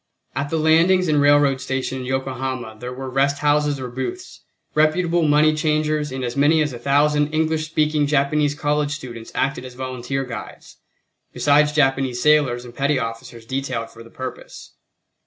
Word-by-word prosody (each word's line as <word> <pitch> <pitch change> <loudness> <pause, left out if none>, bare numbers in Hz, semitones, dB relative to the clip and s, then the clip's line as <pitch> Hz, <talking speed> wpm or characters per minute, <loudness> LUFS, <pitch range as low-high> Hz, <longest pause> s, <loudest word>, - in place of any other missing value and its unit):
At 140 +1 -2
the 160 - -1
landings 165 +4 +4
and 150 -2 +2
railroad 145 -2 +4
station 130 0 -3
in 130 - -6
Yokohama 130 -3 -3
there 125 +2 -6
were 130 +1 -6
rest 135 +2 +1
houses 145 -1 +1
or 130 - -4
booths, 130 - -6 0.3
reputable 170 +3 +2
money 155 0 +4
changers 155 -1 0
and 130 0 -4
as 120 -1 -3
many 145 +3 +4
as 150 -3 -3
a 120 - -7
thousand 145 +2 +2
English 155 0 0
speaking 155 -1 +1
Japanese 145 0 +1
college 145 -1 0
students 120 -6 -8
acted 135 -1 -1
as 125 -1 -10
volunteer 130 +1 -4
guides, 115 -4 -9 0.6
besides 150 +1 +3
Japanese 135 -4 +1
sailors 140 -4 +2
and 120 - -11
petty 140 +2 +1
officers 115 -1 -6
detailed 125 -3 -3
for 115 - -14
the 115 - -13
purpose. - - -9
140 Hz, 165 wpm, -21 LUFS, 130-150 Hz, 0.6 s, landings